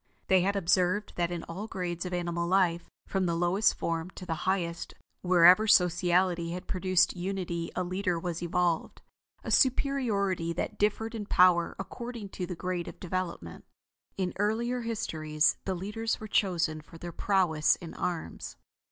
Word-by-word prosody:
They 190 Hz, -1 st, +5 dB
had 200 Hz, +3 st, +1 dB
observed 185 Hz, +2 st, +1 dB
that 170 Hz, -1 st, +1 dB
in 175 Hz, -2 st, -4 dB
all 195 Hz, +6 st, -6 dB
grades 180 Hz, -3 st, -4 dB
of -, -, -6 dB
animal 170 Hz, -1 st, -2 dB
life, 175 Hz, -2 st, +1 dB, 0.2 s
from 190 Hz, -2 st, -1 dB
the 170 Hz, -, 0 dB
lowest 175 Hz, +5 st, +2 dB
form 165 Hz, +1 st, -2 dB
to 185 Hz, -, -8 dB
the 165 Hz, -, -2 dB, 0.2 s
highest, 170 Hz, -3 st, -2 dB, 0.3 s
wherever 180 Hz, +4 st, +6 dB
sociality 180 Hz, -2 st, +3 dB
had 180 Hz, -, -6 dB
produced 185 Hz, -1 st, +2 dB
unity 175 Hz, -2 st, -3 dB
a 185 Hz, -, 0 dB
leader 180 Hz, -1 st, -1 dB
was 170 Hz, -1 st, -4 dB
evolved, 175 Hz, -1 st, -1 dB, 0.4 s
a -, -, -5 dB
superiority 210 Hz, -11 st, +1 dB
that 170 Hz, -, -4 dB
differed 215 Hz, +2 st, 0 dB
in 210 Hz, -3 st, -5 dB
power 180 Hz, -3 st, +4 dB
according 235 Hz, +1 st, -7 dB
to 180 Hz, -2 st, -5 dB
the 180 Hz, -, -5 dB
grade 180 Hz, 0 st, -3 dB
of -, -, -9 dB
development. 175 Hz, -, -4 dB, 0.5 s
In 185 Hz, -2 st, 0 dB
the -, -, -13 dB
earlier 235 Hz, +4 st, 0 dB
histories, 160 Hz, -10 st, 0 dB
the 190 Hz, -, -1 dB
leaders 210 Hz, +5 st, -3 dB
were 215 Hz, -, -7 dB
chosen 175 Hz, -6 st, +1 dB
for 165 Hz, -, -14 dB
their 175 Hz, +1 st, -7 dB
prowess 170 Hz, -5 st, +2 dB
in 170 Hz, -3 st, -10 dB
arms. 175 Hz, -3 st, -4 dB
180 Hz, 160 wpm, -29 LUFS, 170-200 Hz, 0.5 s, wherever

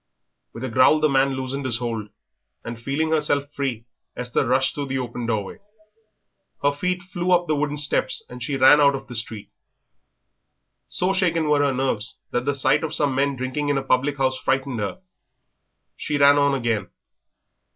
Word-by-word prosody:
With 115 Hz, -, -9 dB
a 130 Hz, -, -2 dB
growl 130 Hz, +6 st, +4 dB
the 155 Hz, -, +3 dB
man 135 Hz, -1 st, +2 dB
loosed 130 Hz, +1 st, -4 dB
his 125 Hz, -4 st, -1 dB
hold, 115 Hz, -3 st, -4 dB, 0.6 s
and 115 Hz, 0 st, -7 dB
feeling 150 Hz, +5 st, -1 dB
herself 145 Hz, -2 st, 0 dB
free 130 Hz, -6 st, -3 dB, 0.3 s
Esther 125 Hz, +1 st, -1 dB
rushed 130 Hz, +2 st, +2 dB
through 145 Hz, -1 st, -4 dB
the 135 Hz, 0 st, -2 dB
open 120 Hz, -2 st, -4 dB
doorway. 110 Hz, -, -3 dB, 1.0 s
Her 145 Hz, -, +4 dB
feet 180 Hz, +5 st, -2 dB
flew 185 Hz, -1 st, -3 dB
up 175 Hz, -1 st, +4 dB
the 155 Hz, -2 st, 0 dB
wooden 145 Hz, 0 st, -1 dB
steps 145 Hz, -3 st, 0 dB
and 125 Hz, 0 st, -10 dB
she 135 Hz, +2 st, -2 dB
ran 135 Hz, +3 st, +7 dB
out 140 Hz, -1 st, +5 dB
of 135 Hz, -, -7 dB
the 125 Hz, -, -10 dB
street. 110 Hz, -2 st, -3 dB, 1.4 s
So 185 Hz, +2 st, 0 dB
shaken 170 Hz, -5 st, +1 dB
were 150 Hz, -1 st, +3 dB
her 145 Hz, -1 st, +2 dB
nerves 125 Hz, -4 st, -2 dB
that 125 Hz, +1 st, -1 dB
the 145 Hz, 0 st, 0 dB
sight 140 Hz, -, +2 dB
of 160 Hz, -, -3 dB
some 145 Hz, -2 st, +1 dB
men 140 Hz, +1 st, +1 dB
drinking 130 Hz, +3 st, -3 dB
in 145 Hz, -, +1 dB
a 135 Hz, -, -2 dB
public 135 Hz, +2 st, +1 dB
house 130 Hz, -1 st, 0 dB
frightened 135 Hz, -1 st, -1 dB
her. 105 Hz, -, -4 dB, 0.9 s
She 150 Hz, -, -2 dB
ran 145 Hz, 0 st, +6 dB
on 140 Hz, -1 st, +3 dB
again. 115 Hz, -6 st, -1 dB
135 Hz, 185 wpm, -23 LUFS, 125-145 Hz, 1.4 s, ran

